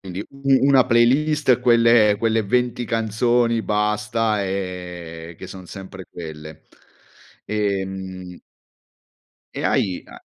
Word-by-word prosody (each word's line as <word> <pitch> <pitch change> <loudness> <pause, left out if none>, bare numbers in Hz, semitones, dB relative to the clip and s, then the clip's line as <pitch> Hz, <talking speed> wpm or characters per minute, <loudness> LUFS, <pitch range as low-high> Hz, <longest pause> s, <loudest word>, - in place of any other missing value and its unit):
quindi 95 0 -7
u 135 -1 +2
una 135 -2 +5
playlist, 130 +2 +3
quelle 115 -3 +5
quelle 115 -1 +1
20 120 +3 0
canzoni 115 +1 +1
basta, 105 0 0
ehm, 90 -3 -6
che - - -9
son 95 -1 -10
sempre 95 0 -10
quelle. 80 -2 -9 0.8
Ehm 95 -3 -4 1.1
e - - -5
hai 95 -3 0
a - - -13
105 Hz, 105 wpm, -21 LUFS, 95-120 Hz, 1.1 s, una